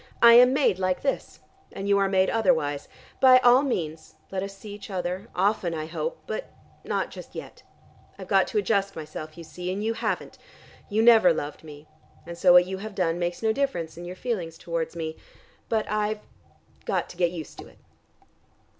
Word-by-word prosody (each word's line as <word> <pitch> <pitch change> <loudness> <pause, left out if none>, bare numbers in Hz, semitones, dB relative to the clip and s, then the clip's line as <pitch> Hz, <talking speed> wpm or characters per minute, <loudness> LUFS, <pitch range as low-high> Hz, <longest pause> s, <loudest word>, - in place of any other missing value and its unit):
I 235 0 +8
am 250 +2 +8
made 265 -9 +2
like 185 -1 -1
this, 275 - -3 0.3
and 195 - -6
you 200 0 +4
are 195 -1 +2
made 190 -1 +2
otherwise. 150 - +1 0.3
By 260 -1 +8
all 250 +1 +6
means, 165 - -3 0.2
let 190 -1 -2
us 195 0 -6
see 205 +1 -9
each 205 0 -10
other, 185 +2 -3
often 185 -3 +1
I 155 -1 -4
hope, 485 - -5
but - - -5 0.3
not - - -2
just - - -11
yet. - - -9 0.6
I've - - -9
got - - +3
to - - -3
adjust 200 - +1
myself, 155 0 -8
you 170 - -8
see, 180 +3 -6
and 200 +3 -3
you 225 +1 0
haven't. - - -3 0.5
You 220 +2 +2
never 225 -6 +7
loved 150 -2 -4
me, 150 -1 -12 0.4
and 170 0 -7
so 180 +1 +4
what 180 0 +8
you 190 +1 -5
have 215 0 -7
done 175 -2 0
makes 175 +3 -3
no 220 0 +2
difference 220 - -2
in 170 - -9
your 180 +1 -7
feelings 180 -8 -4
towards 165 0 -4
me. 160 -1 -4 0.5
But 220 -1 +1
I've 215 0 -1 0.6
got - - -1
to - - -12
get 175 -1 +2
used 165 -4 -8
to - - -9
it." - - -19
190 Hz, 195 wpm, -26 LUFS, 170-220 Hz, 0.6 s, I